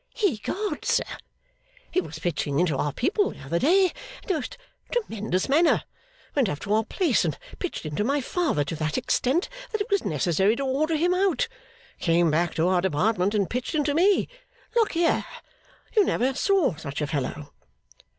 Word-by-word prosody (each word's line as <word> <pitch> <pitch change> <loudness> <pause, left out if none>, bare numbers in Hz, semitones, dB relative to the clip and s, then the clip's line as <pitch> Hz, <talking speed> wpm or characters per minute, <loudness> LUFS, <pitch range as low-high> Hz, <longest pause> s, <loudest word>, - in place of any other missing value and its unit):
'Ecod, 395 - -1
sir, - - +2 0.9
he 370 - +2
was - - -8
Pitching 150 -4 -1
into 175 -5 +2
our 145 +2 0
people 385 - +1
the - - -11
other 170 +6 -1
day 375 - +5 0.4
in - - -19
the 385 - +2
most 305 -7 -4 0.3
tremendous 220 - -1
manner. 320 +5 +4 0.5
Went 265 -8 +2
up 145 - -3
to 205 - -1
our 220 +1 +3
place 310 - +1
and - - -1 0.2
Pitched 360 - -4
into 155 +6 -1
my 280 +6 +1
father 285 - 0
to 140 +3 -4
that 155 0 -1
extent 260 +5 +1 0.2
that 435 - -1
it 410 - -3
was 400 - +2
necessary 175 +7 +2
to 275 - -3
order 300 +5 +1
him 350 +4 +2
out. 365 -7 +2 0.5
Came 170 -1 +3
back 170 +2 +1
to 165 +2 +2
our 180 -1 +3
Department, 190 +4 +1
and 200 -3 +2
Pitched 250 +6 -3
into 295 -1 +1
me. 370 +6 +3 0.5
Look 465 -3 +2
here. 335 0 +2 0.7
You 425 - +6
never 265 -6 +1
saw 360 - +2
such 145 -2 -6
a - - +1
fellow. 145 0 -4
245 Hz, 180 wpm, -25 LUFS, -, 0.9 s, You